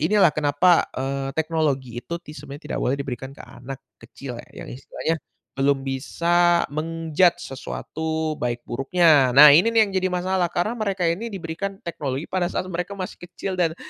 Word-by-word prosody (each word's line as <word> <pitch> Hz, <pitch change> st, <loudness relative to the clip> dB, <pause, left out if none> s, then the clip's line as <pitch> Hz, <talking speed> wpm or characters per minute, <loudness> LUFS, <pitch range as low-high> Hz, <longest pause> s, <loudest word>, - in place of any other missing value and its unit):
inilah 185 Hz, +1 st, +4 dB
kenapa, 155 Hz, +4 st, +3 dB
eee, 135 Hz, +1 st, -3 dB
teknologi 145 Hz, -7 st, -1 dB
itu 170 Hz, -, -11 dB
tis 150 Hz, -2 st, -11 dB
sebenarnya 145 Hz, +1 st, -10 dB
tidak -, -, -2 dB
boleh 130 Hz, -, +1 dB
diberikan 135 Hz, -1 st, -6 dB
ke -, -, -10 dB
anak 135 Hz, +2 st, -10 dB, 0.2 s
kecil 120 Hz, +1 st, -9 dB
ya, -, -, -19 dB
yang -, -, -10 dB
istilahnya 160 Hz, +5 st, -3 dB, 0.3 s
belum 135 Hz, 0 st, +1 dB
bisa 170 Hz, +6 st, +2 dB
men-judge 165 Hz, +2 st, +1 dB
sesuatu 160 Hz, +3 st, -3 dB
baik 120 Hz, -1 st, -2 dB
buruknya. 135 Hz, -1 st, +3 dB
Nah 145 Hz, +1 st, +11 dB
ini 170 Hz, +10 st, +6 dB
nih 225 Hz, -1 st, +5 dB
yang 200 Hz, -, -6 dB
jadi 185 Hz, -1 st, +1 dB
masalah 180 Hz, 0 st, 0 dB
karena 175 Hz, +6 st, -1 dB
mereka 205 Hz, -5 st, -2 dB
ini 170 Hz, +8 st, 0 dB
diberikan 195 Hz, 0 st, -5 dB
teknologi 145 Hz, -4 st, -3 dB
pada 180 Hz, -1 st, -1 dB
saat -, -, -2 dB
mereka 180 Hz, +4 st, -4 dB
masih 185 Hz, -2 st, -6 dB
kecil 175 Hz, +2 st, -6 dB
dan 175 Hz, -3 st, 0 dB
160 Hz, 170 wpm, -23 LUFS, 135-180 Hz, 0.3 s, Nah